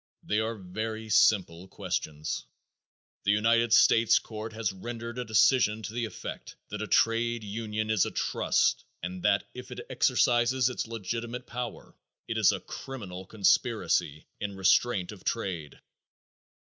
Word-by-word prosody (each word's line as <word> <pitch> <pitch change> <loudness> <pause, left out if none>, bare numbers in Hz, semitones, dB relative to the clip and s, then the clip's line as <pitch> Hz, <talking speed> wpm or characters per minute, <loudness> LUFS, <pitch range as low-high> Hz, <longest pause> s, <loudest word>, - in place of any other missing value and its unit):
They 105 - 0
are 110 +1 -1
very 110 +3 -5
simple 95 -5 +3
questions. 75 -4 -4 0.8
The 100 - +3
United 115 +2 +3
States 115 0 +6
court 110 0 -6
has 110 -3 -2
rendered 115 +4 -6
a - - -1
decision 110 0 +3
to 105 +2 -5
the 120 0 -1
effect 110 - -8
that 105 0 -5
a 110 - -3
trade 115 +1 +2
union 110 +1 -3
is 110 -3 +3
a - - -2
trust - - +1 0.2
and 90 +1 -5
that - - +2
if - - -9
it - - -7
exercises 120 +1 +3
its 125 - -3
legitimate 115 +3 -4
powers 120 -1 -6 0.3
it - - -2
is - - +6
a - - -3
criminal 95 -9 -8
conspiracy 95 -7 +1
in 100 -1 -4
restraint 95 +1 +2
of 105 - -12
trade. 90 -10 -3
110 Hz, 145 wpm, -29 LUFS, 95-115 Hz, 0.8 s, States